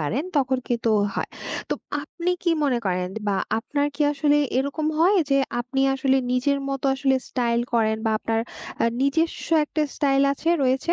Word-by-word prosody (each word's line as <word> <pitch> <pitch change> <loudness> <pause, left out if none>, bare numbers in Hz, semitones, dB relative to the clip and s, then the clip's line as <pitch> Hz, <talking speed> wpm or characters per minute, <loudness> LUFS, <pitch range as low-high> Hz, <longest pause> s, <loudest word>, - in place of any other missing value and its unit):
পারেন 220 - -1
তখন 260 -2 +2
কিন্তু 235 -1 -1
তো 220 - +4 0.2
হয়। - - -2 0.4
তো - - 0 0.3
আপনি 340 +4 -3
কি 345 - +2
মনে 255 -4 +2
করেন 180 -1 0 0.2
বা 195 - +1 0.2
আপনার 285 +5 -1
কি 295 - -1
আসলে 290 +1 +2 0.2
এরকম 280 +3 -1
হয়? 370 +5 +5
যে 275 - +4 0.2
আপনি 250 +3 -2
আসলে 265 0 +2 0.2
নিজের 280 +3 +1
মতো 275 0 -3
আসলে 270 0 +1
স্টাইল 235 -2 0
করেন 220 -2 +2
বা - - +3
আপনার 225 0 -1 0.4
আ - - +4 0.2
নিজস্ব 320 +5 0 0.2
একটা 305 +1 -2
স্টাইল 275 -2 +2
আছে 315 +4 -4
রয়েছে? 265 +6 +1
270 Hz, 175 wpm, -24 LUFS, 240-290 Hz, 0.4 s, হয়